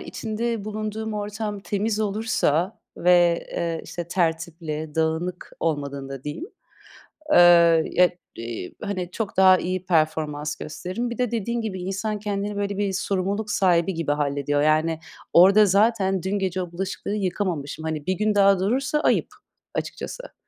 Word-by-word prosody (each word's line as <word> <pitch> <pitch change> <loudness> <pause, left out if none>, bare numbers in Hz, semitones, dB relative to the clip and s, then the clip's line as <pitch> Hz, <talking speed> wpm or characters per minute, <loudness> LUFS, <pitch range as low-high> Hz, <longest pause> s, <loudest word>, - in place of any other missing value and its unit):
içinde 225 -1 -3
bulunduğum 215 +1 -4
ortam 210 0 -4
temiz 210 +2 -1
olursa 205 -4 0 0.2
ve, 175 -1 +4
eee, 165 -1 -2
işte, 175 -1 -6
tertipli, 160 -3 -2
dağınık 160 +3 -2
olmadığında 140 -4 -3
diyeyim, 150 - -5 0.9
ııı, - - +7 0.5
ya, 180 0 +5 0.3
eee, 115 -5 -6
hani, 185 -4 -3
çok 210 0 -4
daha 185 -1 +7
iyi 185 0 -3
performans 155 -3 0
gösteririm. 185 +10 -4
Bir 235 - -6
de 250 -3 0
dediğin 235 +1 -2
gibi 190 -5 -4
insan 205 +3 -2
kendini, 205 0 -3
böyle, 200 0 -2
bir 200 -1 0
sorumluluk 200 +2 -1
sahibi 180 -2 +2
gibi 165 -3 -1
hallediyor. 145 0 0
Yani, 155 +1 +2 0.3
orda 195 +5 +7
zaten 195 -2 +2
dün 195 +2 -1
gece 185 -1 -1
o 175 -1 -7
bulaşıkları 190 +3 -4
yıkamamışım. 180 -6 -2
Hani, 155 -2 -3
1 185 - +1
gün 210 +2 0
daha 195 -2 +5
durursa 270 +9 0
ayıp - - +2 0.5
açıkçası. - - -6
185 Hz, 140 wpm, -24 LUFS, 160-210 Hz, 0.9 s, ııı